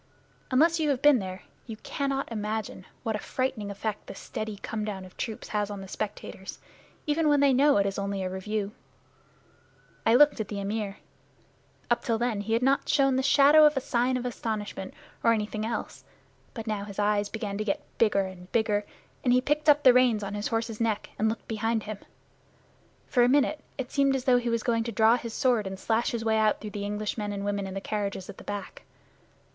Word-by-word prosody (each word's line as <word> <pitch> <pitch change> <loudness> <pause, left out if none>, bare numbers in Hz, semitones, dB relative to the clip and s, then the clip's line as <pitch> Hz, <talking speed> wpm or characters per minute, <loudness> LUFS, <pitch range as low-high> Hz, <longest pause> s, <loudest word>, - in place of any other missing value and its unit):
Unless 325 +6 +4
you 310 -2 +1
have 270 -2 0
been 290 -4 +7
there 185 -1 -6 0.2
you 225 -2 -6
cannot 275 0 -3
imagine 215 -3 -4 0.2
what 225 -3 -1
a - - -3
frightening 250 -5 -2
effect 210 +1 -4
this - - -8
steady 215 -1 -5
come 220 -1 -3
down 195 -3 -5
of 185 - -15
troops 220 -3 -5
has 210 -1 -1
on 200 -1 -6
the 195 - -8
spectators, 190 -1 -6 0.5
even 305 +1 +1
when 290 -1 +4
they 280 -1 +5
know 280 +1 +5
it 200 - +3
is 195 0 -2
only 200 -1 -2
a - - -1
review. 200 +2 -3 1.3
I 225 - +4
looked 290 0 +6
at 215 - -2
the 205 -1 -5
Amir. 200 0 -3 0.9
Up - - +2
till 230 -3 +1
then 235 -3 -1
he 220 +2 -2
had 230 +2 +2
not 270 +1 +2
shown 270 -2 +3
the 260 - +2
shadow 285 +3 +6
of 300 -2 0
a - - +4
sign 250 0 0
of 250 - -5
astonishment 215 -5 -4 0.3
or 230 - +5
anything 215 0 -2
else. 235 - -5 0.5
But 225 -3 -5
now 210 -3 -2
his 200 -2 -10
eyes 205 0 +1
began 210 -2 -4
to - - 0
get 295 +6 -2
bigger 210 -3 +4
and 185 -1 -8
bigger, 210 -3 +1 0.4
and 245 - +3
he 250 - +5
picked 295 +3 +1
up 295 0 +5
the 255 - +8
reins 245 -4 +4
on 200 0 -4
his 205 0 -2
horse's 225 -1 -2
neck 220 -3 -1
and 220 +1 +3
looked 225 - -5
behind 225 0 -1
him. 215 -1 -6 1.1
For 250 - +2
a 240 - +5
minute 290 +3 +3 0.2
it 260 -2 -5
seemed 275 -1 +3
as 260 - -2
though 250 -1 +4
he 240 0 -2
were 230 - +2
going 230 0 0
to 235 - -3
draw 225 +1 +5
his 230 -2 -5
sword 240 -6 +2
and 190 0 -5
slash 225 +4 0
his 230 -1 -3
way 220 0 +3
out 215 -1 +2
through 210 - -7
the 200 0 -4
English 210 +2 -3
men 205 -1 -2
and 200 0 -4
women 200 -1 -1
in 190 - -7
the - - -2
carriages 200 -2 -3
at 195 - -15
the - - -11
back. 205 -2 -6
220 Hz, 220 wpm, -27 LUFS, 205-255 Hz, 1.3 s, the